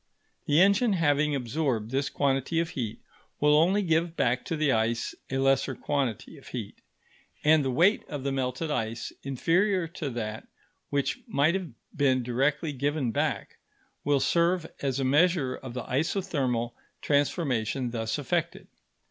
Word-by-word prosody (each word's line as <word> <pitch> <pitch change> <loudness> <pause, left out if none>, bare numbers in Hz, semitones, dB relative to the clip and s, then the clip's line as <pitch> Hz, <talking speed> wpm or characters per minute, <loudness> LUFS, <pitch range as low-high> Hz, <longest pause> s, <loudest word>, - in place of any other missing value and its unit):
The 150 +2 +4
engine 200 +4 +4
having 150 -4 +2
absorbed 125 -3 -1
this 135 +1 0
quantity 140 +4 0
of 165 -1 -1
heat, 115 -5 -4 0.4
will 150 0 +4
only 185 +7 +4
give 165 -1 +1
back 125 +1 +1
to 165 - -2
the 150 -2 +2
ice 115 0 0 0.2
a 135 - -1
lesser 135 0 +2
quantity 135 -7 -2
of - - -17
heat; - - -7 0.6
and 155 0 +5
the 135 - 0
weight 175 - +3
of 145 -4 -5
the 140 - -1
melted 135 +4 -2
ice, 115 -4 -2
inferior 170 - +1
to 160 -3 -4
that 110 -3 -5 0.4
which 140 - -1
might 155 -6 +2
have 185 -3 -3 0.3
been 130 -3 +2
directly 140 +5 0
given 140 -2 -1
back, - - -2 0.5
will 145 -1 +2
serve 170 +4 +2 0.2
as 135 -1 -1
a - - 0
measure 150 -1 +3
of 130 -1 -8
the 125 - -3
isothermal 135 - -1 0.3
transformation 135 -4 0
thus 115 0 -2
effected. 170 +3 -2
140 Hz, 150 wpm, -28 LUFS, 125-165 Hz, 0.6 s, and